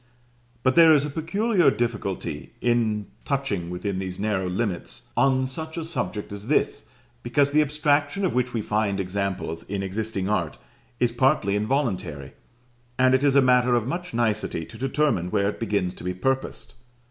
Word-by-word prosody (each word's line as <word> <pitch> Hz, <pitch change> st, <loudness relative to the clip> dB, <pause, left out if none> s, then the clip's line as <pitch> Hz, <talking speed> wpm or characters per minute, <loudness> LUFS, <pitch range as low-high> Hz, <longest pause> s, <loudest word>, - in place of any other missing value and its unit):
But 130 Hz, -, +3 dB
there 165 Hz, 0 st, +8 dB
is 145 Hz, -1 st, +2 dB
a 150 Hz, -, -4 dB
peculiar 175 Hz, +2 st, +2 dB
difficulty 100 Hz, -, -3 dB
in 115 Hz, -3 st, +1 dB, 0.2 s
touching 120 Hz, -12 st, -2 dB
within 95 Hz, +2 st, -3 dB
these 95 Hz, -1 st, -5 dB
narrow 100 Hz, -3 st, 0 dB
limits 95 Hz, -1 st, -3 dB
on 130 Hz, -1 st, +3 dB
such 160 Hz, +5 st, -4 dB
a 165 Hz, -, -3 dB
subject 105 Hz, -12 st, -4 dB
as 100 Hz, +1 st, -7 dB
this, 140 Hz, -, +1 dB, 0.4 s
because 140 Hz, +4 st, +2 dB
the 150 Hz, +1 st, +4 dB
abstraction 150 Hz, +4 st, +1 dB
of 180 Hz, -, 0 dB
which 125 Hz, 0 st, 0 dB
we 115 Hz, -3 st, -2 dB
find 105 Hz, -2 st, 0 dB
examples 95 Hz, -3 st, -2 dB
in 100 Hz, 0 st, -4 dB
existing 100 Hz, 0 st, -2 dB
art, 105 Hz, -, -1 dB, 0.4 s
is 120 Hz, -1 st, +2 dB
partly 120 Hz, -5 st, +2 dB
involuntary; 110 Hz, 0 st, -1 dB, 0.6 s
and 130 Hz, 0 st, +4 dB
it 130 Hz, +1 st, +3 dB
is 140 Hz, -1 st, +3 dB
a 140 Hz, -, +6 dB
matter 125 Hz, -1 st, +4 dB
of 120 Hz, -2 st, +1 dB
much 175 Hz, +7 st, -4 dB
nicety 110 Hz, -8 st, -1 dB
to -, -, -14 dB
determine 135 Hz, -, +1 dB
where 100 Hz, +2 st, +1 dB
it -, -, -6 dB
begins 100 Hz, -5 st, -1 dB
to -, -, -11 dB
be 90 Hz, 0 st, -3 dB
purposed. 135 Hz, +8 st, -2 dB
120 Hz, 170 wpm, -25 LUFS, 100-140 Hz, 0.6 s, there